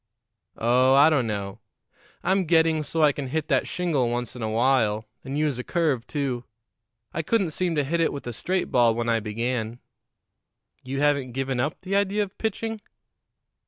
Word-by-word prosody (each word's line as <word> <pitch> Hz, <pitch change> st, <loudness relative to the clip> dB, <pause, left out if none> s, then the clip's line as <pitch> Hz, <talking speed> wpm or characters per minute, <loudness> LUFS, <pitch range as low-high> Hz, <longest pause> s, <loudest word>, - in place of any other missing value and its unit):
"Oh, 125 Hz, +3 st, +4 dB
I 145 Hz, +3 st, +7 dB
don't 135 Hz, -6 st, +2 dB
know. 100 Hz, -2 st, -4 dB, 0.6 s
I'm 190 Hz, +1 st, +2 dB
getting 160 Hz, -1 st, +3 dB
so 155 Hz, +2 st, 0 dB
I 150 Hz, -, +6 dB
can 140 Hz, -1 st, -5 dB
hit 155 Hz, +3 st, -2 dB
that 135 Hz, -4 st, +2 dB
shingle 155 Hz, -9 st, 0 dB
once 120 Hz, 0 st, -3 dB
in 125 Hz, -, -8 dB
a 110 Hz, -, -1 dB
while, 110 Hz, -2 st, +2 dB, 0.2 s
and 135 Hz, +2 st, -4 dB
use 150 Hz, -4 st, 0 dB
a -, -, -3 dB
curve, 150 Hz, -8 st, 0 dB
too. 135 Hz, -5 st, -2 dB, 0.7 s
I -, -, -1 dB
couldn't 190 Hz, 0 st, +1 dB
seem 175 Hz, +1 st, -1 dB
to 145 Hz, -, +2 dB
hit 165 Hz, +5 st, -1 dB
it 165 Hz, -, +2 dB
with 140 Hz, -, -7 dB
a 120 Hz, -, -4 dB
straight 185 Hz, +9 st, -2 dB
ball 120 Hz, -2 st, +4 dB
when 120 Hz, 0 st, -1 dB
I 115 Hz, -1 st, +3 dB
began." 115 Hz, +2 st, -3 dB, 1.1 s
"You 135 Hz, +2 st, -3 dB
haven't 140 Hz, -4 st, +1 dB
given 135 Hz, -1 st, -2 dB
up 145 Hz, +5 st, -1 dB
the 195 Hz, +1 st, -2 dB
idea 200 Hz, +1 st, +2 dB
of 195 Hz, -1 st, -9 dB
pitching?" 220 Hz, 0 st, -3 dB
135 Hz, 185 wpm, -25 LUFS, 120-165 Hz, 1.1 s, I